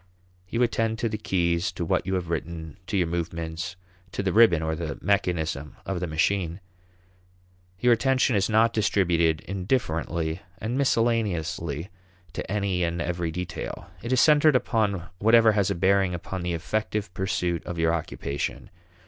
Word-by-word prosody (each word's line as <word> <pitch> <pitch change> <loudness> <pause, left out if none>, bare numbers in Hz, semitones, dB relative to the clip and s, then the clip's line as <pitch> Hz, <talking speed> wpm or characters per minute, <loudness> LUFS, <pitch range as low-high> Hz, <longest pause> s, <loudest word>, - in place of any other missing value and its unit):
You 120 +5 +1
attend 115 -2 0
to 115 +1 -1
the 105 -1 -4
keys, 85 -4 0
to 85 - -3
what 85 - 0
you 95 - 0
have 90 -2 -3
written, 85 0 -4
to 100 - -1
your 90 - +3
movements, 85 +1 -4 0.4
to - - -2
the 95 -3 0
ribbon 105 -8 +6
or 80 0 -1
the 80 -3 -4
mechanism 80 -7 -1
of 95 -2 -2
the 90 - -2
machine. 85 +2 0 1.2
Your 125 +2 +5
attention 130 0 +2
is 100 +1 +2
not 115 +1 +4
distributed 85 -7 +2
indifferently 85 -5 -1 0.2
and 115 +4 -3
miscellaneously 100 - 0 0.4
to - - -5
any 100 -3 0
and 85 0 -1
every 85 0 -2
detail. 85 +1 -6
It 120 - -5
is 130 - +4
centered 150 0 +6
upon 105 -7 +1 0.2
whatever 115 +2 +6
has 100 -3 +1
a - - 0
bearing 95 0 +2
upon 90 +2 -5
the 90 0 -2
effective 105 +3 -2
pursuit 90 -2 -1
of 90 - -4
your 80 0 +2
occupation. 70 -3 -4
90 Hz, 155 wpm, -26 LUFS, 85-110 Hz, 1.2 s, ribbon